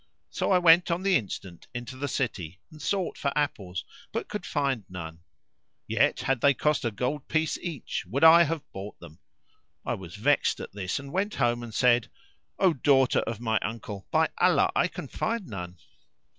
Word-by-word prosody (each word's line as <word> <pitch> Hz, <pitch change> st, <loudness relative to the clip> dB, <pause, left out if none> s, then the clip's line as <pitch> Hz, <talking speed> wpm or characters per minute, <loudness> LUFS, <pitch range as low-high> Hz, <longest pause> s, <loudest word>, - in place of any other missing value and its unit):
So -, -, -1 dB
I 185 Hz, -, +6 dB
went 175 Hz, 0 st, +6 dB
on 170 Hz, +2 st, -1 dB
the 195 Hz, -1 st, +3 dB
instant 95 Hz, -6 st, -4 dB
into 120 Hz, +2 st, -6 dB
the 140 Hz, +2 st, -3 dB
city 95 Hz, -, -3 dB
and 155 Hz, -1 st, -13 dB
sought 195 Hz, -3 st, -1 dB
for 140 Hz, -, 0 dB
apples 100 Hz, -11 st, -2 dB, 0.3 s
but -, -, -3 dB
could 210 Hz, -3 st, -5 dB
find 140 Hz, -6 st, 0 dB
none; 85 Hz, -2 st, -7 dB, 0.7 s
yet, -, -, +2 dB
had 135 Hz, -3 st, 0 dB
they 140 Hz, -1 st, +5 dB
cost 150 Hz, +3 st, +1 dB
a 120 Hz, -, +1 dB
gold 125 Hz, +7 st, -3 dB
piece 160 Hz, 0 st, 0 dB
each, 165 Hz, -8 st, -4 dB
would 135 Hz, -, -1 dB
I 165 Hz, +1 st, +9 dB
have 165 Hz, -2 st, 0 dB
bought 100 Hz, +2 st, -8 dB
them. 80 Hz, -2 st, -13 dB, 0.7 s
I -, -, 0 dB
was 90 Hz, -2 st, -8 dB
vexed 135 Hz, +7 st, +2 dB
at -, -, -7 dB
this 95 Hz, -2 st, -3 dB
and 140 Hz, -1 st, -7 dB
went 200 Hz, +3 st, -1 dB
home 120 Hz, -2 st, +1 dB
and 120 Hz, -1 st, -7 dB
said, 120 Hz, 0 st, +3 dB, 0.5 s
"O 185 Hz, -3 st, +4 dB
daughter 135 Hz, -2 st, +3 dB
of 115 Hz, -2 st, -3 dB
my 110 Hz, -2 st, +1 dB
uncle. 105 Hz, -4 st, -6 dB
by -, -, +3 dB
Allah -, -, +4 dB
I -, -, +3 dB
can -, -, -7 dB
find 225 Hz, -3 st, -2 dB
none!" 90 Hz, -5 st, -7 dB
130 Hz, 185 wpm, -27 LUFS, 105-155 Hz, 0.7 s, I